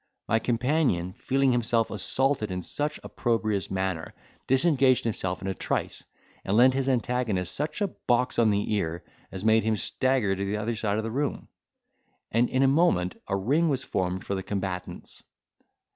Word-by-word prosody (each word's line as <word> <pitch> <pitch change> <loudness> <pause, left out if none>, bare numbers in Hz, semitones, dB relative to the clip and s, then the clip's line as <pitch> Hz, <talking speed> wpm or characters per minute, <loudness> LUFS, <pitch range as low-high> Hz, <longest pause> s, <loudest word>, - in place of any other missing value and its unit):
My 110 - +2
companion, 120 - 0
feeling 135 +4 +1
himself 115 -2 +1
assaulted 125 +3 +1
in 90 -1 -4
such 150 - -2
an - - -19
opprobrious 110 -4 -1
manner, 95 -4 -3 0.3
disengaged 135 -2 +4
himself 95 -5 -3
in - - -3
a 95 - -1
trice, - - -2 0.4
and 100 +2 0
lent 130 +2 +6
his 135 0 0
antagonist 120 -7 0
such 150 +6 -3
a 205 - +2 0.2
box 120 +1 +2
on 115 -2 +5
the 105 +1 0
ear 85 -4 -2 0.3
as 95 +2 -6
made 110 0 +5
him 110 0 +1
stagger 125 -1 +1
to 95 - -3
the 100 +2 -1
other 110 +2 -2
side 105 -1 -1
of 110 - -1
the 115 - -3
room; 145 +4 -2 0.8
and, 120 +2 +2
in 130 +1 +2
a - - +5
moment, 135 - +2
a 95 - 0
ring 145 - +2
was 135 -2 0
formed 95 0 -2
for - - -2
the 95 - -2
combatants. 95 -2 -5
110 Hz, 175 wpm, -27 LUFS, 95-130 Hz, 0.8 s, lent